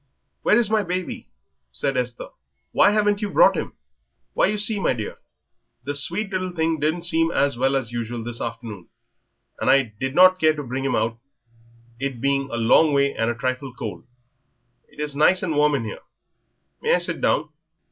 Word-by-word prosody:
"Where 210 - +3
is 240 -3 +3
my 220 -1 +3
baby?" 185 -1 -4 0.4
said 135 - -2
Esther. 125 -1 -3 0.4
"Why - - +5
haven't 205 0 +1
you 210 - -2
brought - - +5
him?" - - -4 0.6
"Why, - - +3
you 210 - -1
see, 210 0 +2
my - - +1
dear, 110 -4 -6 0.6
the 145 +3 -3
sweet 175 +9 0
little 185 -1 -2
thing 160 -1 0
didn't 160 +4 -1
seem 165 -1 +2
as 140 -4 +1
well 135 +3 +1
as 130 -4 -2
usual 120 0 -4
this 120 0 -4
afternoon, 115 -5 -7 0.7
and - - 0
I 135 -5 +3
did 130 +1 -3
not 185 +1 +6
care 155 -2 +3
to 150 - -5
bring 130 +1 -4
him 135 - 0
out, 115 +1 -1 0.8
it 135 -3 -4
being 140 +1 0
a 115 - -4
long 145 +7 +4
way 140 0 +2
and 115 +1 -1
a 120 - -2
trifle 130 +1 -4
cold.... - - -7 0.8
It - - -18
is 150 -1 -3
nice 165 +6 +4
and 165 -4 -1
warm 150 0 +3
in 130 - -2
here. 110 - -7 0.8
May - - +3
I - - +3
sit 175 -1 -1
down?" 150 0 +1
140 Hz, 190 wpm, -22 LUFS, 125-175 Hz, 0.8 s, not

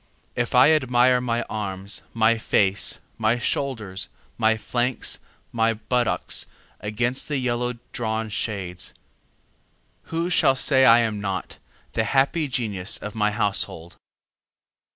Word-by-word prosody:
If 120 +1 -1
I 130 +5 +7
admire 125 -4 +4
my 120 -1 0
arms, 100 -2 -4
my 115 0 +3
face, 100 -2 +2 0.2
my 115 +2 +2
shoulders, 115 -7 -2 0.5
flanks, 120 +2 -1 0.3
buttocks 115 +1 0 0.3
against 120 +5 -1
the 150 -2 -1
yellow 125 -1 -1 0.2
drawn 110 -1 -2
shades, 95 -5 -4 1.1
Who 165 +2 -2
shall 135 -5 +4
say 130 +2 +4
I 115 0 +7
am 110 -3 -1
not 95 -2 -4 0.3
the 110 - 0
happy 140 +5 +2
genius 110 -7 -2
of 105 - -7
my 105 -2 +1
household? 100 -5 -1
115 Hz, 110 wpm, -24 LUFS, 105-125 Hz, 1.1 s, I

